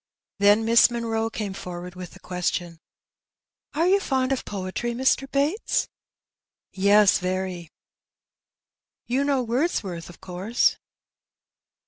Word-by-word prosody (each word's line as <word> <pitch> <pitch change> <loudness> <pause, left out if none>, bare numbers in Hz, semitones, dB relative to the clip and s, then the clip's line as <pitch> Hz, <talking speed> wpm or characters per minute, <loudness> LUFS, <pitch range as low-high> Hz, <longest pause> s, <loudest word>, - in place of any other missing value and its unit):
Then 205 +2 +4
Miss 230 +2 +6
Munroe 225 -1 -2
came 210 -3 -4
forward 180 -1 -7
with 180 -2 -9
the - - -14
question 175 -2 -3 0.5
— - - -33
^^ - - -3
Are 330 - +4
you 390 +2 +4
fond 265 -7 0
of 270 - -1
poetry, 200 +5 -4
Mr. 265 +2 +1
Bates? 290 +10 0 0.4
'* - - -68
"Yes, 200 +1 +4
very." 185 -2 -3 0.7
" - - -68
You 270 +2 +2
know 280 -3 +1
Wordsworth, 225 - -2
of 175 - -14
course 190 +6 0
210 Hz, 130 wpm, -24 LUFS, 185-255 Hz, 0.7 s, Miss